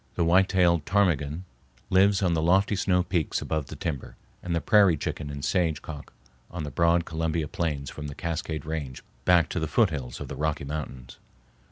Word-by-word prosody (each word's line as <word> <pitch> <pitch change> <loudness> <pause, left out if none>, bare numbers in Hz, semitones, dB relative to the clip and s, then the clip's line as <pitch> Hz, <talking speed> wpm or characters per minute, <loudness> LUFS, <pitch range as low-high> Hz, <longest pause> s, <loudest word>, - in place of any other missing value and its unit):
The 85 - +1
white 95 +3 +4
tailed 85 -4 +3
ptarmigan 85 -5 +1 0.5
lives 95 +2 +4
on 90 -2 +2
the 80 - +1
lofty 95 +5 +3
snow 90 -2 +2
peaks 90 -3 -1
above 80 -3 -3
the - - -8
timber, 75 -6 -5 0.3
and 85 -1 -2
the - - +2
prairie 100 -3 +4
chicken 75 +1 -4
and 70 -1 -5
sage 85 -5 0
cock 75 -2 -8 0.4
on 85 -2 -5
the 75 - -5
broad 85 +2 +2
Columbia 80 -1 -2
plains 75 -7 -3
from 75 -1 -7
the 70 - -7
Cascade 80 -2 -4
Range 75 -5 -5 0.2
back 90 -2 +5
to - - -2
the 80 - -2
foothills 75 - 0
of - - -6
the - - -6
Rocky 75 -1 -1
Mountains. 70 -4 -7
80 Hz, 190 wpm, -26 LUFS, 75-90 Hz, 0.5 s, back